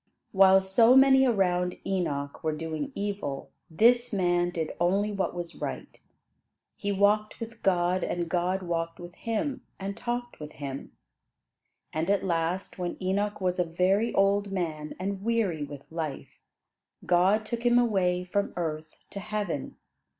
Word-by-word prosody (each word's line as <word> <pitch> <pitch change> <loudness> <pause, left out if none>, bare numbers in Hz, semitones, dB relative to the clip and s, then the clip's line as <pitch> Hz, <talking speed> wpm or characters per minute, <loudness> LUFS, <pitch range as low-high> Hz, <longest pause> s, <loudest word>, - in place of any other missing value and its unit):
While 190 0 +6
so 225 +6 +5
many 265 0 +6
around 180 -5 +1
Enoch 145 -7 -2
were 155 -1 0
doing 160 -2 -4
evil, 200 -9 -4 0.2
this 240 +8 +4
man 175 -3 +2
did 165 -3 -3
only 195 +5 +2
what 195 -3 -2
was 175 -1 -5
right. - - -6 0.7
He 205 - -3
walked 205 +2 +2
with 230 0 -8
God 180 -1 +2
and 175 -1 -2
God 180 +3 0
walked 165 -1 -3
with 175 0 -9
him, 240 - -3 0.2
and 195 +1 -4
talked 240 +1 -4
with 150 0 -8
him. 140 -1 -7 1.0
And 160 +3 -1
at 200 -1 +2
last, 175 +2 -1
when 175 -1 -3
Enoch 200 +3 -1
was 180 -1 0
a - - +4
very 185 +7 +1
old 200 0 +2
man 160 -5 -3
and 195 +1 -3
weary 205 -8 0
with 145 -1 -8
life, 160 -4 -5 0.7
God 190 +5 +3
took 235 +1 -4
him 240 0 +4
away 190 -7 +2
from 200 +3 -1
earth 155 -2 -4 0.2
to 200 - -5
heaven. 205 -7 -3
185 Hz, 150 wpm, -28 LUFS, 170-205 Hz, 1.0 s, While